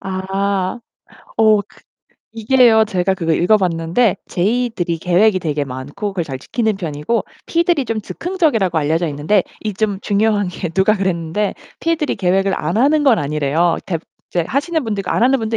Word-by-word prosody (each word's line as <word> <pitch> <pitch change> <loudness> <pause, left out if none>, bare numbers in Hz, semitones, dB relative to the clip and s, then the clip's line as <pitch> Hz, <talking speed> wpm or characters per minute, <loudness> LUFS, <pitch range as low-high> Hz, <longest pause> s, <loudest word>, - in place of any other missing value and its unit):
아. 195 +2 -2 0.6
어 215 -2 +5
그 205 - -23 0.5
이게요. 225 0 +4
제가 190 -2 0
그거 165 -3 -1
읽어봤는데 180 +2 +2
J들이 200 -3 0
계획이 185 +4 +3
되게 150 -4 -2
많고 135 +9 -5
그걸 180 -3 -2
잘 135 -4 -6
지키는 220 - -1
편이고 165 +4 -2 0.2
P들이 340 -4 +1
좀 225 -1 -2
즉흥적이라고 260 - 0
알려져 160 +3 0
있는데 155 +7 +1 0.2
이 210 -3 -3
좀 205 -1 -1
중요한 205 -1 +1
게 180 0 -4
누가 190 +5 +3
그랬는데 190 +1 -1 0.3
P들이 325 -3 0
계획을 195 +1 +1
안 155 +6 -2
하는 290 +4 +3
건 260 -6 +5
아니래요. 150 +3 +1
대부분 165 -4 -4 0.2
이제 175 -2 0
하시는 315 +5 0
분들 210 -3 -2
있고 185 - -5
안 - - +1
하는 265 +2 +4
분도 225 0 -1
195 Hz, 360 characters per minute, -18 LUFS, 170-225 Hz, 0.6 s, 어